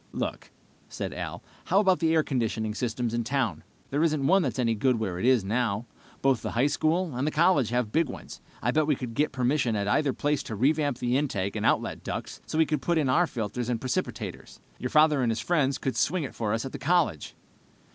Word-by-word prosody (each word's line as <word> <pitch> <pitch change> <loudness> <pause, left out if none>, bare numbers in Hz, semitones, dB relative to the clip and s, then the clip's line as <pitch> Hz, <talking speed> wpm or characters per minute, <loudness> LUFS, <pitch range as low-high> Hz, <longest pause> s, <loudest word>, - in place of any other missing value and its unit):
"Look," - - -4 0.4
said - - -5
Al, - - -6 0.2
"how 195 - +3
about 190 -3 +3
the 160 -1 +2
air 160 - +4
conditioning 110 -5 -1
systems 120 0 -2
in 120 0 0
town? 130 -3 -1 0.3
There 145 +2 +1
isn't 155 -4 +1
one 190 +7 +5
that's 130 -9 -2
any 115 -3 +2
good 125 +4 +2
where 95 -5 -3
it - - -1
is, 130 -5 +4
now. 110 +1 -1 0.4
Both 135 -4 +3
the - - -3
high 120 +4 +2
school 155 +2 0
and 130 +4 -1
the - - +3
college 155 - +3
have 120 -3 -1
big 160 0 +2
ones. - - -9 0.2
I'll 120 - +2
bet 150 +2 +2
we 150 - +3
could 125 -2 -6
get 150 +6 +1
permission 130 -2 +1
at 100 -1 -1
either 145 +6 +2
place 145 +1 0
to 110 - -6
revamp 145 +3 +1
the 125 +1 +1
intake 100 -9 -2
and - - 0
outlet - - 0
ducts - - -5
so - - -3
we 160 - +5
could 150 -1 -1
put 170 -1 +1
in 145 -4 +1
our 170 +7 +3
filters 115 0 -3
and 120 -2 0
precipitators. 130 +1 -4 0.2
Your 125 - -3
father 150 -1 +4
and 120 - +1
his 110 - -2
friends 140 0 +1
could 130 - -3
swing 170 +1 +1
it 135 - -6
for 110 -3 -2
us 115 +2 -1
at 135 - -5
the 145 - -7
college." 155 - 0
130 Hz, 230 wpm, -27 LUFS, 115-150 Hz, 0.4 s, one